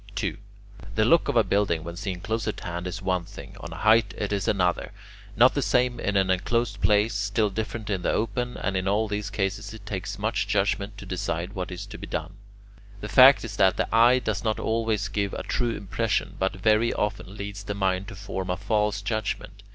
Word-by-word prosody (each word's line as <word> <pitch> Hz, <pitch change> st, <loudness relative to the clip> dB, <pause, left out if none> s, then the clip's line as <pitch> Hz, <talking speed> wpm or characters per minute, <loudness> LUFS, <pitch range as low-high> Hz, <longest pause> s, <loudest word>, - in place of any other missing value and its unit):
2. 100 Hz, -, -1 dB, 0.6 s
The 110 Hz, 0 st, +3 dB
look 170 Hz, +8 st, +4 dB
of -, -, 0 dB
a -, -, +6 dB
building 95 Hz, -6 st, +1 dB
when 85 Hz, 0 st, -7 dB
seen 95 Hz, -1 st, -4 dB
close 110 Hz, +1 st, -2 dB
at -, -, -3 dB
hand 85 Hz, +1 st, -4 dB
is 95 Hz, +2 st, -5 dB
one 90 Hz, -2 st, 0 dB
thing, -, -, -11 dB
on 85 Hz, -, -8 dB
a -, -, -7 dB
height 110 Hz, +3 st, +3 dB
it 105 Hz, 0 st, -2 dB
is 100 Hz, -2 st, -1 dB
another, 90 Hz, -3 st, +1 dB, 0.4 s
not 120 Hz, +4 st, +6 dB
the 145 Hz, -, 0 dB
same 125 Hz, +1 st, +1 dB
in 100 Hz, 0 st, 0 dB
an 95 Hz, -1 st, +3 dB
enclosed 100 Hz, +2 st, 0 dB
place, 105 Hz, +1 st, +3 dB
still 100 Hz, +1 st, 0 dB
different 110 Hz, +1 st, -4 dB
in 95 Hz, -3 st, -1 dB
the -, -, +1 dB
open, 120 Hz, +3 st, -1 dB
and 100 Hz, -, -2 dB
in 95 Hz, 0 st, -1 dB
all 105 Hz, +3 st, +2 dB
these 105 Hz, 0 st, -3 dB
cases 100 Hz, +1 st, -3 dB
it 105 Hz, -2 st, -13 dB
takes 100 Hz, -1 st, -4 dB
much 110 Hz, +3 st, -1 dB
judgment 100 Hz, 0 st, 0 dB
to -, -, -9 dB
decide 90 Hz, 0 st, -3 dB
what 90 Hz, -1 st, -4 dB
is 90 Hz, +2 st, -6 dB
to 100 Hz, -, -10 dB
be -, -, -7 dB
done. 85 Hz, +3 st, -4 dB, 0.6 s
The 105 Hz, -, -6 dB
fact 130 Hz, +2 st, +7 dB
is 105 Hz, -3 st, -7 dB
that 95 Hz, -1 st, +4 dB
the -, -, +1 dB
eye 120 Hz, +2 st, +6 dB
does 110 Hz, -5 st, -2 dB
not 110 Hz, -2 st, 0 dB
always 110 Hz, -2 st, 0 dB
give 100 Hz, -1 st, -2 dB
a -, -, -4 dB
true 120 Hz, -2 st, -1 dB
impression, 105 Hz, +2 st, -1 dB
but 95 Hz, +2 st, +1 dB
very 110 Hz, +4 st, +3 dB
often 100 Hz, -1 st, -3 dB
leads 100 Hz, 0 st, -6 dB
the 105 Hz, 0 st, -4 dB
mind 95 Hz, -1 st, 0 dB
to -, -, -8 dB
form 95 Hz, -1 st, -5 dB
a 90 Hz, -, 0 dB
false 105 Hz, +1 st, 0 dB
judgment. 105 Hz, -1 st, -3 dB
100 Hz, 220 wpm, -26 LUFS, 95-110 Hz, 0.6 s, fact